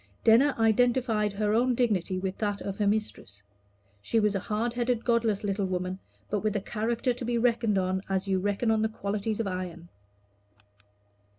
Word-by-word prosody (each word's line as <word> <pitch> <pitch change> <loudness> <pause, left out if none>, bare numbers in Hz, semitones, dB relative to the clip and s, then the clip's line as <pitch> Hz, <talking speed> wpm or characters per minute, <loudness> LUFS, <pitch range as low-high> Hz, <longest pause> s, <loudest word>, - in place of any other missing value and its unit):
Denner 250 +6 +5
identified 225 -1 +2
her 210 +1 0
own 245 +2 +2
dignity 205 -6 0
with 190 0 -4
that 205 -2 -1
of 195 +1 -5
her 205 - +2
mistress. 200 - -3 0.6
She 225 - +1
was 210 -1 +2
a 195 - 0
hard 220 +5 -2
headed 240 -1 -1
godless 230 -4 +1
little 200 -1 -1
woman, 185 0 -3 0.3
but 210 - -1
with 215 +1 -1
a - - +2
character 230 +5 -1
to 245 - -8
be 240 0 0
reckoned 230 -3 +2
on 190 0 0
as 190 0 -1
you 190 -1 +1
reckon 205 +4 0
on 220 -1 +2
the 220 - +1
qualities 210 0 -3
of 225 - 0
iron. 180 -2 -5
210 Hz, 180 wpm, -28 LUFS, 195-230 Hz, 0.6 s, Denner